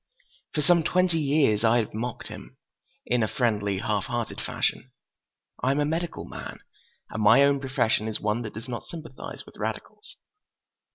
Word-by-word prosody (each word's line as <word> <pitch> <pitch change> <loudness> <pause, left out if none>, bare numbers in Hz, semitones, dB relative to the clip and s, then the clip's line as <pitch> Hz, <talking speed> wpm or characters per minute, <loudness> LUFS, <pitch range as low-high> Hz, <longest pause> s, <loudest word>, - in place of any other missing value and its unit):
For 150 - +1
some 170 +3 +5
twenty 180 0 +2
years 140 -7 +3
I 115 +1 +5
have 115 -3 -1
mocked 120 +3 -4
him, - - -10 0.5
in 125 -1 +2
a 110 - +2
friendly, 105 -6 0
half 105 0 -1
hearted 120 -2 -3
fashion. 130 - -1 0.7
I 130 - +2
am 140 +2 +2
a 145 - +3
medical 165 +3 -2
man, - - -7 0.5
and 110 - -3
my 115 +6 +7
own 140 0 +4
profession 130 -5 +1
is 110 - -2
one 105 +3 0
that 110 -4 -6
does 115 +3 -7
not 120 -2 -5
sympathize 160 -6 -8
with - - -15
radicals. - - -6
125 Hz, 170 wpm, -27 LUFS, 110-145 Hz, 0.7 s, my